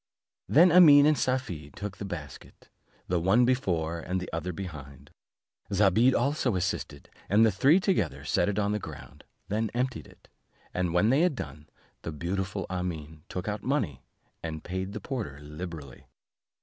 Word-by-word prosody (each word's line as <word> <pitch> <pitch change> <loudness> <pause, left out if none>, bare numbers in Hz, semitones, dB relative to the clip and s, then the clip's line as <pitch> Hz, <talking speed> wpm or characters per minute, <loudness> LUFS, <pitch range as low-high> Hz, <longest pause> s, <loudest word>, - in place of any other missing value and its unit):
Then 170 +5 +6
Amene 150 -5 +8
and 155 0 +5
Safie 125 - -2
took 105 +5 -7
the 100 - -6
basket, 75 -8 -9 0.4
the 90 -1 +1
one 95 +8 +4
before 85 -10 0
and 90 +3 -2
the 90 - -6
other 85 +2 -2
behind; 75 -7 -9 0.6
Zobeide 105 +6 +4
also 140 -6 +1
assisted, 70 -5 -3 0.2
and 105 +3 +5
all 110 - +4
three 140 - +4
together 180 - -1
set - - +1
it 100 - -2
on 105 -1 +1
the 105 - -1
ground; - - -10 0.2
then 110 +1 -1
emptied 125 +1 -2
it; - - -20 0.5
and 90 -2 -1
when 90 +7 +3
they 140 +4 +4
had 175 -5 +2
done, 75 - -8 0.3
the 80 - -5
beautiful 95 +5 -3
Amene 80 -4 -5
took 90 - -5
out 105 0 -3
money, 115 - -1 0.4
and 80 -1 -5
paid 95 +2 -4
the 105 - -4
porter 105 - -5
liberally. 75 -2 -9
95 Hz, 160 wpm, -28 LUFS, 80-120 Hz, 0.6 s, Amene